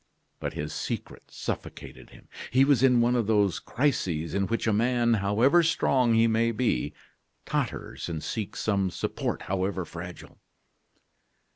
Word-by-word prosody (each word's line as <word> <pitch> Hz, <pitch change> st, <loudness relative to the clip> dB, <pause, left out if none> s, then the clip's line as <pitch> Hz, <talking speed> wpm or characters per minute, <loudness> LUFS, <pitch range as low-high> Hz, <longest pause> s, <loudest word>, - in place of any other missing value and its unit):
But -, -, -4 dB
his 75 Hz, +1 st, -4 dB
secret -, -, -5 dB
suffocated -, -, -7 dB
him. -, -, -17 dB, 0.2 s
He 130 Hz, +2 st, +4 dB
was 140 Hz, -4 st, +3 dB
in 125 Hz, -3 st, +5 dB
one 120 Hz, +1 st, +3 dB
of 115 Hz, -4 st, 0 dB
those 105 Hz, -4 st, +2 dB
crises 90 Hz, -, -1 dB
in 100 Hz, -1 st, 0 dB
which 115 Hz, -, -1 dB
a 110 Hz, -, +2 dB
man, 120 Hz, +2 st, +2 dB
however 110 Hz, -, +3 dB
strong 130 Hz, -7 st, +2 dB
he 115 Hz, 0 st, +5 dB
may 115 Hz, +1 st, +2 dB
be, 90 Hz, -, -1 dB, 0.5 s
totters -, -, -3 dB
and 80 Hz, -2 st, -4 dB
seeks 110 Hz, -3 st, -4 dB
some 100 Hz, -3 st, +1 dB
support, -, -, -3 dB
however 95 Hz, -1 st, -2 dB
fragile. 85 Hz, +1 st, -9 dB
110 Hz, 145 wpm, -27 LUFS, 95-120 Hz, 0.5 s, in